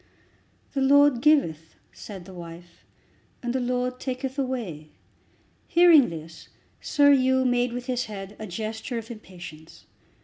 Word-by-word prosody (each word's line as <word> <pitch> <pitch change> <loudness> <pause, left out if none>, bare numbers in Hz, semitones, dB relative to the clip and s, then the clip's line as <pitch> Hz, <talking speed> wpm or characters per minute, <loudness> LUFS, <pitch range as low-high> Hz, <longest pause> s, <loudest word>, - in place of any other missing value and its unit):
"The 275 - -1
Lord 285 -2 +5
giveth," 165 - +2 0.2
said 190 -4 -10
the 190 - -12
wife, 170 0 -12 0.6
"and 240 0 -2
the 260 - 0
Lord 250 0 -2
taketh 260 +1 -4
away." 220 - -4 0.8
Hearing 335 -6 +6
this 165 0 -10 0.3
Sir 285 -1 +4
Hugh 260 -1 +3
made 245 -1 +1
with 245 +1 -5
his 250 -1 -1
head 200 -1 -8
a 215 - -6
gesture 220 +5 -5
of 230 0 -7
impatience. 175 -7 -12
245 Hz, 135 wpm, -25 LUFS, 180-260 Hz, 0.8 s, Hearing